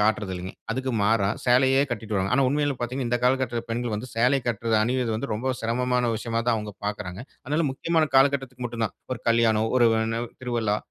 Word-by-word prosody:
காட்றதில்லிங்க. 95 -4 -1 0.2
அதுக்கு 130 +2 -2
மாறா, 100 -1 +3 0.2
சேலையே 130 +2 +4
கட்டிட்டு 110 -2 -4
வராங்க. 95 +1 0
ஆனா 135 0 +3
உண்மையில 145 0 +1
பார்த்தீங்கன்னா, 125 +1 -3
இந்த 120 0 +1
காலகட்டத்தில 125 -2 +1
பெண்கள் 120 -1 -2
வந்து, 110 +5 -4
சேலை 125 +4 +3
கட்ரத 115 -1 0
அணிவது 125 -1 0
வந்து, 130 +6 -4
ரொம்ப 130 +4 -1
சிரமமான 125 +1 0
விஷயமா 115 +1 -2
தான் 120 - +3
அவுங்க 105 -1 -5
பாக்குறாங்க. 105 0 -4 0.2
அதனால 150 +3 0
முக்கியமான 160 +3 +1
காலகட்டத்துக்கு 135 -2 +2
மட்டும் 115 -1 -2
தான். 105 - -4 0.2
ஒரு 120 - -4
கல்யாணம், 115 -1 +3
ஒரு 120 - +6
வ் 110 - +2
ன்ன 115 +1 -1 0.2
திருவிழா, 115 -4 0
120 Hz, 185 wpm, -25 LUFS, 110-130 Hz, 0.2 s, ஒரு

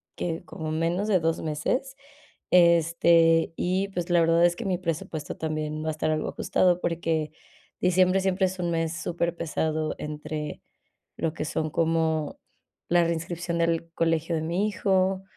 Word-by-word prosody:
¿qué?, 165 -2 -3
como 155 -1 -6
menos 170 +5 0
de 195 -4 +3
2 165 0 0
meses, 165 - -2 0.6
este, 170 -1 +4
y, 185 +2 0
pues, 175 -2 -4
la 175 -1 +4
verdad 165 +1 +4
es 175 0 +2
que 230 - -5
mi 185 -2 0
presupuesto 165 -3 -4
también 155 -1 -3
va - - -4
a - - +1
estar 155 0 -1
algo 155 -1 -1
ajustado, 180 -1 +1
porque 165 -2 -1 0.5
diciembre 185 +1 +3
siempre 190 0 +1
es 185 0 -7
un 175 -1 -1
mes 165 0 -1
superpesado 160 -2 -2
entre 150 0 -5 0.6
lo 165 -1 -1
que 155 - -4
son 155 +1 -2
como 160 -1 0 0.5
la 175 0 +4
reinscripción 170 +1 -2
del 165 0 0
colegio 165 0 0
de 160 - -1
mi 175 +6 0
hijo, 190 -2 +1
165 Hz, 155 wpm, -26 LUFS, 160-180 Hz, 0.6 s, este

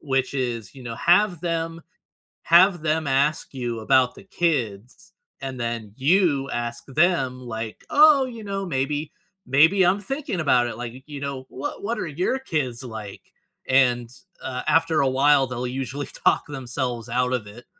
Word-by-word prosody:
which 135 -3 -1
is, 120 -6 -3
you 135 - -11
know, 120 -2 -5
have 180 -1 +3
them 165 -1 -2 0.7
have 175 0 +6
them 155 -1 0
ask 140 +2 +1
you 120 -3 -3
about 125 +2 +3
the 200 - -13
kids, 155 - -2 0.3
and 135 -1 -5
then, 115 -3 -4
you 145 -2 +2
ask 120 0 -4
them, 135 -4 +1
like, 110 -2 -6
'Oh, 295 -2 +6
you 230 -3 -8
know, 195 -1 -3
maybe 145 0 -2 0.3
maybe 160 +8 +5
I'm 185 +3 +3
thinking 270 - -4
about 125 -5 +3
it, 115 - -5
like, 120 -1 -5
you 130 - -12
you 145 -2 -7
know, 140 -2 -5
what 135 +3 -6
what 230 +4 -2
are - - -2
your 175 - -1
kids 135 - -3
like?' 110 -5 -9 0.4
and, 125 -3 +3 0.3
uh, 130 -1 -4
after 165 -1 +3
a 135 - +2
while, 135 +1 +4
they'll 125 0 -4
usually 135 +2 -4
talk - - +1
themselves 125 -4 -4
out 125 +1 0
of 115 -5 -2
it." 115 +4 -12
135 Hz, 170 wpm, -24 LUFS, 125-165 Hz, 0.7 s, have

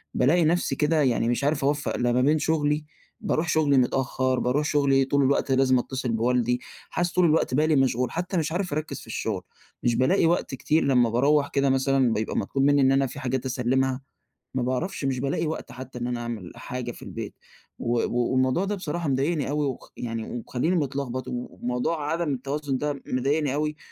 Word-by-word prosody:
بالاقي 160 +6 +3
نفسي 175 +3 +1
كده 155 +1 +2
يعني 120 -4 +2
مش 120 +3 0
عارف 145 0 +1
أوفق 145 +1 0
لا 120 0 +1
ما 125 +1 +2
بين 150 +4 +3
شغلي، 150 -1 0 0.3
باروح 160 +1 -1
شغلي 150 -3 +3
متأخر، 130 0 +1
باروح 140 +5 +1
شغلي 140 -3 +3
طول 140 +1 +2
الوقت 135 0 +1
لازم 130 -1 +4
أتصل 130 -1 -3
بوالدي، 125 +1 +1 0.3
حاسس 175 0 -1
طول 180 -1 +4
الوقت 155 -5 +2
بالي 155 +3 +3
مشغول، 125 -2 +1
حتى 180 +2 -2
مش 160 -1 0
عارف 180 -2 -2
أركّز 155 0 -3
في - - -13
الشغل. 110 -3 -3 0.4
مش 120 -1 +2
بالاقي 165 +10 +3
وقت 165 -4 +1
كتير 150 +4 +1
لما 125 -4 +3
باروّح 140 +5 +3
كده 140 -1 +1
مثلًا 135 -2 +2
بيبقى 110 0 -2
مطلوب 135 +7 0
مني 145 0 +4
إن 135 0 +5
أنا 135 0 +3
فيه 135 +3 -8
حاجات 130 0 -2
أسلّمها، 130 +1 0 0.5
ما 130 - 0
باعرفش 130 +7 -2
مش 130 -2 0
بالاقي 140 +5 -1
وقت 160 - -5
حتى 130 0 -8
إن 120 - -3
أنا 120 -1 -2
أعمل 115 -6 -5
حاجة 125 -1 -5
في - - -14
البيت. - - -6 0.4
و 120 - -2 0.4
والموضوع 130 +7 +2
ده 205 +1 -1
بصراحة 170 -4 -3
مضايقني 140 +2 0
أوي 150 0 0
وخ 130 -3 -5
يعني 115 -2 -4
ومخليني 125 +8 -1
متلغبط 135 -4 -2
وموضوع 125 +5 -2
عدم 165 -3 -1
التوازن 140 +1 -3
ده 145 -1 -3
مضايقني 140 +2 0
أوي، 150 +1 -1
135 Hz, 190 wpm, -25 LUFS, 125-150 Hz, 0.5 s, إن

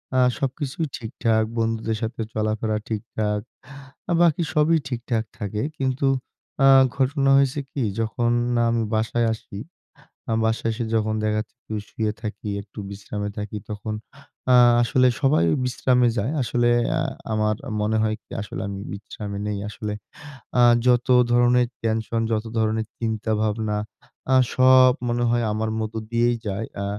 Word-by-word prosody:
আ - - +3 0.2
সবকিছুই 140 +3 -2
ঠিকঠাক। 110 -1 0
বন্ধুদের 115 -1 -1
সাথে 115 +1 -3
চলাফেরা 110 0 -1
ঠিকঠাক। 105 -1 -2 0.8
বাকি 170 -1 +4
সবই 155 +2 +4
ঠিকঠাক 120 -2 -2
থাকে 105 +1 -3 0.2
কিন্তু 135 0 0 0.6
আ - - +8 0.3
ঘটনা 135 +1 +1
হয়েছে 140 +1 +2
কি? 135 - -2 0.2
যখন 115 +2 0 0.4
আমি 115 0 +1
বাসায় 115 +1 +1
আসি, 105 -2 -9 0.7
আ - - 0
বাসায় 115 0 0
এসে 115 +1 -3
যখন 110 0 +1
দেখা 105 0 +1
যাচ্ছে 110 - -6
একটু 110 - -9 0.2
শুয়ে 110 -1 -1
থাকি, 105 -1 -5
একটু 100 +1 -12
বিশ্রামে 105 +1 -5
থাকি 105 0 -4
তখন 105 +1 -4 0.6
আ - - +8 0.3
আসলে 130 +1 +3
সবাই 135 - +3
ওই - - +1
বিশ্রামে 125 0 +2
যায়। 110 +8 0
আসলে 120 +1 +1 0.3
আ - - +1 0.3
আমার 105 0 +1 0.3
মনে 110 +1 +1
হয় 110 0 0
কি? - - -34
আসলে 105 - -6
আমি 100 -1 -5
বিশ্রামে 100 0 -7
নেই 105 -1 -2
আসলে 105 0 -5 0.7
আ - - +6 0.3
যতো 125 +1 +4 0.2
ধরণের 120 0 +4 0.2
টেনশন, 115 0 0
যতো 110 +1 -1
ধরনের 110 0 0
চিন্তা 110 -1 -2
ভাবনা 110 -1 -1 0.6
আ - - +6 0.2
সব 130 0 +7 0.2
মনে 120 0 0
হয় 120 0 +2
আমার 110 +1 -1
মধ্য 110 0 -4 0.2
দিয়েই 120 0 +2
যায়। 100 +3 -3 0.2
আ - - -2
110 Hz, 150 wpm, -23 LUFS, 110-125 Hz, 0.8 s, আ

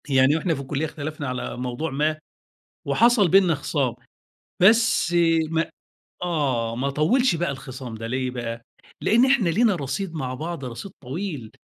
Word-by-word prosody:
يعني 135 +2 +4
وإحنا 165 +1 0
في 140 - -5
الكُلِّيَّة 140 +3 -2
اختلفنا 150 -1 -5
على 125 -1 -4
موضوع 125 +5 -3
ما، 155 +3 0 0.7
وحصل 235 -4 +4
بيننا 180 -1 +4
خِصَام، 140 -4 -1 0.7
بس 220 -3 +4 0.3
ما 165 0 0 0.5
آه، 135 -10 0
ما 135 +3 -1
طوِّلش 170 - +2
بقى 170 -2 -1
الخِصَام 130 -3 -7
ده، 115 +1 -6
ليه 130 +1 -2
بقى؟ 120 -2 -5 0.4
لإن 235 +4 +4
إحنا 260 -9 +3
لينا 215 +3 +3
رصيد 160 +5 -4
مع 130 -5 -3
بعض، 155 +1 -5
رصيد 125 +10 -7
طويل، 140 - -5
150 Hz, 150 wpm, -24 LUFS, 130-175 Hz, 0.7 s, يعني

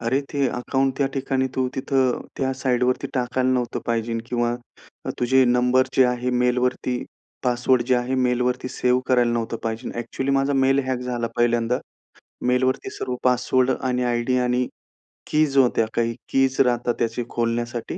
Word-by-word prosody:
"अरे! 130 +4 +1
ते 140 -1 +1
अकाउंट 135 +2 -1
त्या 140 - +2
ठिकाणी 130 -1 0
तू 130 -1 0
तिथं 130 -2 +1 0.2
त्या 135 -1 0
साईडवरती 125 -1 0
टाकायला 125 0 0
नव्हतं 125 -2 -1
पाहिजे." 115 0 -1
किंवा 120 -1 0 0.7
"तुझे 130 +2 +4
नंबर 125 +1 +3
जे 130 - +7
आहेत, 125 0 0
मेलवरती 125 0 0 0.4
पासवर्ड 125 0 +2
जे 130 - +3
आहे, 125 +2 -1
मेलवरती 125 0 0
सेव्ह 125 0 +1
करायला 125 -2 +3
नव्हतं 115 -1 -2
पाहिजे." 115 +2 -3
ॲक्चुअली 125 +3 -3
माझा 135 +1 +2
मेल 135 0 +3
हॅक 130 -1 -1
झाला 125 -2 -2
पहिल्यांदा. 120 0 +2 0.7
मेलवरती 125 +1 +1
सर्व 125 -1 -4
पासवर्ड 125 +1 +2
आणि 125 -1 0
आयडी 120 +1 0
आणि 125 0 +1 0.7
कीज 150 -2 +2
होत्या. 120 -4 +4
काही 115 -1 0
कीज 135 0 +1
राहतात, 120 -2 +2
त्याचे 115 +1 -1
खोलण्यासाठी 120 0 -2
125 Hz, 150 wpm, -23 LUFS, 120-130 Hz, 0.7 s, जे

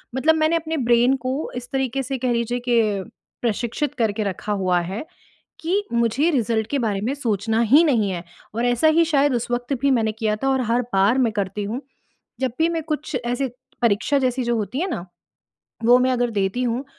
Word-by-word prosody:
मतलब 315 +5 +3
मैंने 315 +1 +2
अपने 320 0 -2
ब्रेन 240 0 +3
को 265 +4 -2
इस 245 0 -6
तरीके 265 0 -1
से 265 +1 -3
कह 250 0 -1
लीजिए 235 +1 -1
कि 235 -1 +4 0.6
प्रशिक्षित 235 +5 -1
करके 220 -2 0
रखा 200 +1 -4
हुआ 185 -3 +1
है 190 - -4 0.6
कि 365 +6 0
मुझे 235 +8 +2
रिज़ल्ट 225 -5 0
के 285 - 0
बारे 210 -5 -1
में 255 - 0
सोचना 225 -4 0
ही 305 - +8
नहीं 225 -10 +2
है 175 -1 -4 0.3
और 235 - -1
ऐसा 245 +6 +3
ही 335 - +6
शायद 290 -4 +2
उस 240 0 -2
वक़्त 245 +3 -2
भी 280 - +2
मैंने 225 -4 +2
किया 215 -1 -1
था 270 - +1
और 265 -1 +2
हर 240 +2 +2
बार 200 +6 +3
मैं 235 -4 +2
करती 205 0 -2
हूँ। 225 +6 -3 0.6
जब 260 -3 0
भी 325 +1 +3
मैं 330 -1 -2
कुछ 305 -3 -3
ऐसे 245 +2 -1 0.3
परीक्षा 235 +6 +2
जैसी 255 -1 0
जो 235 0 +1
होती 220 +5 -3
है 370 - 0
ना, 180 - -4 0.8
वो 245 +2 +7
मैं 255 0 +2
अगर 245 -1 +1
देती 205 +3 -1
हूँ 245 +3 -1
245 Hz, 205 wpm, -22 LUFS, 220-275 Hz, 0.8 s, ही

